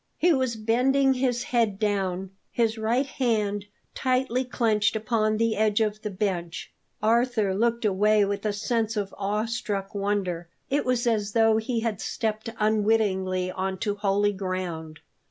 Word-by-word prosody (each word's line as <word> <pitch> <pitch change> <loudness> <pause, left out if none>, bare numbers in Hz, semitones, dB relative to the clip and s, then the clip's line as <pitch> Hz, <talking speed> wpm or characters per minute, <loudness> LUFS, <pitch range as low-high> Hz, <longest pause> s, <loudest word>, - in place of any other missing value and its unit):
He 345 0 +4
was 260 -4 0
bending 260 +5 +3
his 250 -2 0
head 230 -5 +1
down, 195 -3 -1 0.2
his 225 -2 +1
right 235 +5 +1
hand 215 -7 -1 0.3
tightly 255 -1 0
clenched 220 -4 +1
upon 215 0 +1
the 230 0 +1
edge 215 0 +2
of 215 -1 0
the 210 - -3
bench. 185 -4 -3 0.3
Arthur 225 -3 +2
looked 235 +3 +1
away 210 +1 +3
with 200 0 -3
a 215 - +1
sense 220 +1 -1
of 200 -2 -2
awe 205 +2 -1
struck 205 -4 -3
wonder. 195 -4 -2 0.2
It 285 +2 +1
was 250 -1 +1
as 215 -3 0
though 225 -1 +4
he 225 +1 -1
had 225 -4 -2
stepped 215 +3 -2
unwittingly 205 -4 +1
on 190 +1 -3
to 205 - 0
holy 205 0 +1
ground. 180 -5 -4
215 Hz, 155 wpm, -26 LUFS, 200-230 Hz, 0.3 s, He